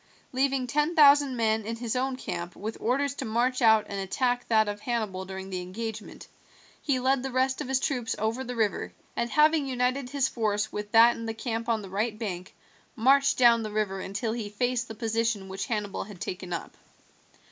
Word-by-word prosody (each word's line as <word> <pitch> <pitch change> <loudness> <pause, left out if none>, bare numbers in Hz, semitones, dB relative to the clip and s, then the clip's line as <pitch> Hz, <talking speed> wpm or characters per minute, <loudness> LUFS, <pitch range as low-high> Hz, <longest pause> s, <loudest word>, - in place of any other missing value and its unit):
Leaving 265 0 +1
ten 295 +6 0
thousand 285 -3 +6
men 220 -1 +1
in 225 +2 -4
his 230 0 -3
own 260 +1 0
camp 175 -8 -5
with 220 +2 -5
orders 275 +4 +1
to 280 - -5
march 245 +3 0
out 220 -2 +5
and 200 - -4
attack 245 +6 -1
that 220 -2 +3
of 205 0 -4
Hannibal 210 -5 -3
during 190 0 -7
the 185 -1 -3
engagement, 220 +4 -7 0.5
he 280 -4 +1
led 260 +1 +2
the 265 - -3
rest 260 +1 0
of - - -4
his 265 0 +1
troops 250 -4 -1
over 225 +4 -1
the 250 -1 -5
river, 220 -4 -1 0.2
and 235 0 -1
having 305 0 +4
united 255 0 -1
his 275 -1 +1
force 215 -3 -1
with 210 0 -5
that 230 +1 +7
in 230 - -6
the 225 - -3
camp 230 0 -3
on 220 -2 0
the - - -8
right 215 +2 -1
bank, 185 -5 -5 0.4
marched 275 +3 +4
down 235 -2 +6
the 215 - -4
river 210 -2 -1
until 210 +4 -3
he 225 -3 -4
faced 245 +3 -1
the 220 - -8
position 225 -3 -1
which 195 +1 -4
Hannibal 210 -3 -3
had 200 -3 -11
taken 180 0 -5
up. 170 - -5
230 Hz, 200 wpm, -27 LUFS, 210-255 Hz, 0.5 s, that